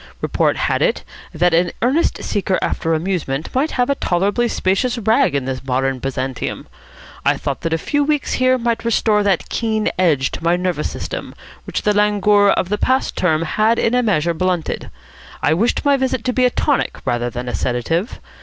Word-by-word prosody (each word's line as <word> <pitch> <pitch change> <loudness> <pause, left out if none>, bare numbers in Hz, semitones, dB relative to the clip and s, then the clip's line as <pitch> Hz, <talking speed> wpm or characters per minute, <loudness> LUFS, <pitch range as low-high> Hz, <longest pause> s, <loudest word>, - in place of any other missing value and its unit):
Report - - 0
had - - 0
it - - +1 0.3
that 175 +2 +1
an 170 +1 +2
earnest 275 +8 +1
seeker 195 -2 0
after 165 -1 -1
amusement 160 -4 -3
might 275 +5 +1
have 245 -1 +1
a 280 - +2
tolerably 200 +1 0
spacious 230 +4 0
rag 225 - +2
in 140 -2 -1
this 130 -1 -4
modern 135 0 -1
Byzantium. 130 -1 -4 0.6
I - - +2
thought 140 - -4
that 165 - -2
a 160 - +2
few 290 - 0
weeks 295 -1 0
here 255 0 +4
might 235 -1 -1
restore 220 -2 +2
that 200 -4 +1
keen 220 -2 0
edge 150 -7 +2
to - - -7
my 170 +1 +3
nervous 180 -4 -1
system - - -6 0.3
which - - -3
the 210 - +2
languor 205 0 +3
of 185 - +1
the 210 0 -1
past 260 +1 +1
term 160 -3 +1
had 215 +7 +1
in 230 - +1
a 250 - +3
measure 170 -7 +1
blunted. 180 0 -2 0.5
I 150 - +3
wished 225 - 0
my 285 -1 +4
visit 260 -3 -1
to 250 - -1
be 255 0 +3
a - - +5
tonic 285 +2 0
rather 120 -1 0
than 120 +1 -6
a 120 - -3
sedative. 165 - -2
195 Hz, 190 wpm, -19 LUFS, 155-235 Hz, 0.6 s, a